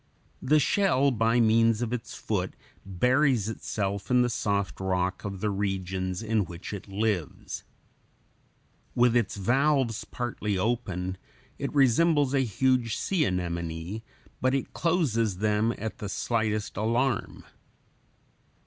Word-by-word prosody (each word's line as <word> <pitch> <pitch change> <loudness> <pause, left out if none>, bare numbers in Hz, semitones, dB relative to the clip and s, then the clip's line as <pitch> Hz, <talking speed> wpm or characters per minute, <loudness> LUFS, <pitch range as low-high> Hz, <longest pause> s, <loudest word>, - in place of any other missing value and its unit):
The 150 +4 +4
shell, 145 -4 +3
by 115 0 +2
means 115 0 +4
of 120 0 -2
its 125 - -5
foot, - - -2 0.3
buries 125 +4 +2
itself 100 -2 -3
in 125 -1 +4
the 120 - 0
soft 100 -3 -1
rock 95 -1 -1
of 100 -2 -5
the 105 - 0
regions 95 -1 -2
in 110 -1 +1
which 85 +4 -8
it 100 0 -7
lives. 100 -5 -2 1.3
With 120 0 +4
its 115 -5 +1
valves 125 +2 +2
partly 110 -5 -3
open 95 -4 -2 0.4
it 140 - -2
resembles 145 +1 +4
a 140 - +3
huge 125 -1 +1
sea 180 -5 +1
anemone; 85 +1 -3 0.4
but 130 +1 +2
it 135 - -3
closes 125 - +1
them 105 +2 +1
at 110 +1 -5
the 105 - -4
slightest 110 -1 -1
alarm. 115 +3 0
110 Hz, 125 wpm, -27 LUFS, 95-125 Hz, 1.3 s, The